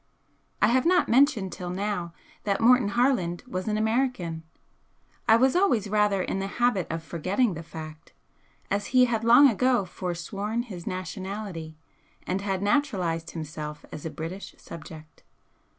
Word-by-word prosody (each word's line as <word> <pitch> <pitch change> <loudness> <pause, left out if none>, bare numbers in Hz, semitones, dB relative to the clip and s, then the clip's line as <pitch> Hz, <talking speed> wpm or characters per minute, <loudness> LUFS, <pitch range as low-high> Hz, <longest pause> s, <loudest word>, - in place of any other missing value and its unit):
I - - +7
have 260 +6 +3
not 360 +1 +4
mentioned 235 -7 +3
till 180 -1 -6
now 185 -2 -2 0.3
that 200 -1 0
Morton 245 -1 +5
Harland 205 -6 +1
was 185 -4 -4
an 215 0 0
American. 220 -7 0 0.9
I 220 - +7
was 260 +5 +3
always 255 - +2
rather 210 -3 +2
in 195 - -2
the 195 - -2
habit 240 -7 +2
of 165 0 -4
forgetting 185 +8 0
the 165 - -6
fact, 155 -1 -10 0.6
as 200 +1 0
he 250 - +8
had 230 -2 -1
long 240 +5 +8
ago 250 -2 +2
forsworn 195 +6 -3
his 185 -8 -9
nationality 185 -2 -5 0.5
and 185 +2 -1
had 195 -1 -2
naturalised 185 - 0
himself 155 -2 -7
as 150 - -8
a 160 - -3
British 165 +6 -7
subject. 155 -1 -11
195 Hz, 150 wpm, -26 LUFS, 170-235 Hz, 0.9 s, he